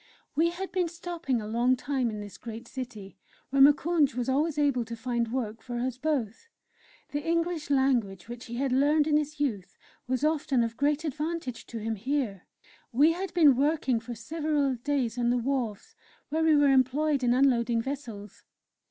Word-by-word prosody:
We 325 +3 +3
had 375 +3 -6
been 360 -1 +1
stopping 335 -6 -3
a 215 - -6
long 240 +4 +2
time 255 -1 -1
in 210 -1 -5
this 205 -1 -10
great 230 +1 -8
city, 235 -7 -8 0.3
where 275 0 +3
Moukounj 295 -1 +4
was 245 -1 -2
always 300 +3 +1
able 280 -5 +2
to 230 +1 -6
find 235 -1 -2
work 225 -3 -3
for 240 +1 -5
us 250 +1 -2
both. 280 - -2 0.6
The 290 0 -2
English 335 -2 -1
language 245 -9 +1
which 240 +1 -8
he 235 - -7
had 265 +1 -1
learned 290 +3 +3
in 300 -1 +3
his 300 0 -3
youth 220 -11 -2 0.3
was 255 +1 -1
often 295 -5 +1
of 230 0 -3
great 290 +3 +1
advantage 305 -3 -4
to 235 - -7
him 225 +1 -2
here. 225 -3 -2 0.4
We 290 +7 +5
had 365 +2 -4
been 300 -6 +6
working 275 -3 +1
for 235 +1 -7
several 300 0 -1
days 250 -2 -1
on 240 0 +2
the 245 - +2
wharves, 245 -4 -2 0.4
where 320 +2 0
we 320 -1 +5
were 290 -1 +5
employed 270 +2 +2
in 245 0 +3
unloading 240 -3 +3
vessels. 230 -7 -7
265 Hz, 180 wpm, -28 LUFS, 235-300 Hz, 0.6 s, been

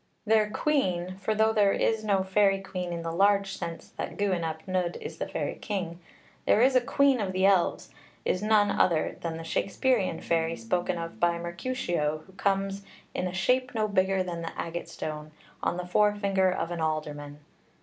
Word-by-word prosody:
Their 215 -1 +3
queen 185 -10 0
for 205 +3 -1
though 220 +1 +3
there 205 -2 +4
is 220 -1 +1
no 200 -3 +2
fairy 195 0 +3
queen 185 -2 -5
in 170 -1 -4
the 165 - -3
large 195 +2 +3
sense 165 0 -6
that - - -4
Gwyn 190 -4 0
ap 160 +1 -4
Nudd 180 -2 -1
is - - -8
the - - -2
fairy - - -2
king, 175 -5 -3 0.5
there - - +5
is 260 +1 +4
a 255 - +6
queen 275 0 +3
of 190 -2 -2
the 190 +1 +2
elves 195 -3 +2 0.3
is 185 - +1
none 210 -1 +4
other 165 -5 +2
than 165 -1 -3
the 165 - -7
Shakspearean 195 +2 0
fairy 165 0 +1
spoken 175 +10 -1
of 165 0 -6
by 170 0 +2
Mercutio, 170 - -2
who 190 - -18
comes 195 0 0 0.3
In 180 0 -2
shape 250 +6 +1
no 215 -1 +1
bigger 190 -1 +2
than 170 -2 -5
an 165 - -4
agate 170 +1 -4
stone 155 0 -6 0.3
On 175 - 0
the 180 - -4
forefinger 200 0 +2
of 175 -2 -2
an 170 -1 -3
alderman. 150 -2 -3
185 Hz, 185 wpm, -28 LUFS, 170-205 Hz, 0.5 s, a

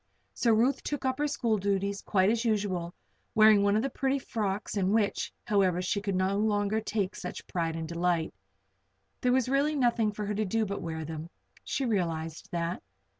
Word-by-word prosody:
So 235 - +2
Ruth 245 +5 +3
took 290 -2 -3
up 260 +1 0
her 295 - +2
school 230 -7 0
duties 200 0 -1
quite 190 +1 +2
as 230 0 0
usual, 195 -6 -1 0.4
wearing 215 -1 +7
one 200 0 +3
of 215 - +2
the 275 - 0
pretty 270 +2 0
frocks 215 -6 -3
in 190 -2 +1
which, 215 -2 +1
however, 190 -4 +2
she 200 +3 -1
could 200 -2 -2
no 190 +2 +1
longer 210 0 +1
take 205 -3 -2
such 180 - -6
pride 165 -2 -2
and 160 -1 -4
delight. 170 0 0 0.9
There 250 - +2
was 255 -1 +2
really 280 +3 +2
nothing 235 -5 +2
for 210 0 -5
her 210 - -2
to 215 +1 0
do 220 +2 0
but 200 0 -4
wear 160 -2 -4
them. 160 +1 -6 0.3
She 275 - -2
realized 165 -5 -2
that. 170 0 -2
205 Hz, 190 wpm, -29 LUFS, 180-225 Hz, 0.9 s, wearing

